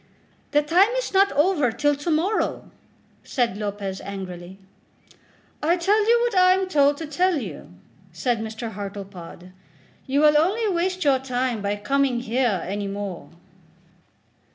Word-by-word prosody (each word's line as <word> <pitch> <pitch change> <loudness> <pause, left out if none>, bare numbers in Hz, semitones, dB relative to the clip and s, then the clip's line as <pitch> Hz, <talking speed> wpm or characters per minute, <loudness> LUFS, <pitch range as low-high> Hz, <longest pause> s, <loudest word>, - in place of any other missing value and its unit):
"The 295 0 +2
time 355 +7 +4
is - - -3
not 395 +1 +4
over 295 -4 +2
till 290 +5 +1
to 290 +4 -5
morrow," 345 +7 -1 0.5
said 240 -7 -1
Lopez 200 -2 -4
angrily. 185 -2 -8 1.0
"I 335 +4 +2
tell 410 +5 +2
you 470 0 +5
what 480 -3 -1
I 365 0 +6
am 380 0 -1
told 285 -4 +3
to 320 - -5
tell 350 +4 +1
you," 200 - -7 0.4
said 225 +8 -1
Mr. 220 +1 -5
Hartlepod. 195 -3 -8 0.6
"You 275 +2 +1
will 300 0 +6
only 415 +8 +1
waste 370 0 -1
your 275 -3 +3
time 250 -3 -2
by 200 0 -1
coming 250 +3 0
here 235 -5 0
any 200 +2 -3
more." 195 -3 -6
265 Hz, 145 wpm, -23 LUFS, -, 1.0 s, I